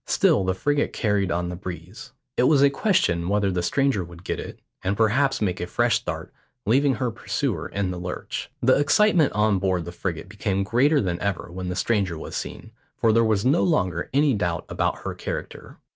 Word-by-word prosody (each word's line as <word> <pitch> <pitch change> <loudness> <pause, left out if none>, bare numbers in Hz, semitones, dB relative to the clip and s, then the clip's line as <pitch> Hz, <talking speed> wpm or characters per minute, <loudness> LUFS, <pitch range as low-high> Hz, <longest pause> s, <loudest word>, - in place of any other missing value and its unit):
Still 100 - +3
the 95 0 0
frigate 145 +9 0
carried 105 -4 0
on 85 +1 -1
the 90 - -4
breeze. 90 - -8 0.2
It 125 - +3
was 145 -3 +5
a 140 - +5
question 95 - +1
whether 100 -1 +1
the 90 -1 -1
stranger 135 +1 +1
would 85 0 -12
get - - -3
it, - - -7 0.3
and 100 +2 -1
perhaps 135 +3 +2
make 90 -3 -1
a 90 - -3
fresh - - +2
start, - - -6 0.3
leaving 135 +4 +3
her 120 +2 -1
pursuer - - -2
in 100 -2 -2
the 90 - -5
lurch. 90 0 -5
The 130 +3 +5
excitement 165 +1 +4
on 105 -2 +2
board 90 -3 0
the 85 - -6
frigate 85 -1 -4
became 100 0 -1
greater 135 +8 +3
than 90 -3 -2
ever 100 -4 -2
when 90 +1 -5
the 90 - -3
stranger 95 -6 0
was - - -7
seen, - - -6 0.3
for 115 -1 +3
there 115 +1 +4
was 110 -2 +1
no 145 +6 +4
longer 125 - 0
any 145 +1 +3
doubt 85 -5 -1
about - - -1
her - - -3
character. - - -6
100 Hz, 205 wpm, -24 LUFS, 90-135 Hz, 0.3 s, was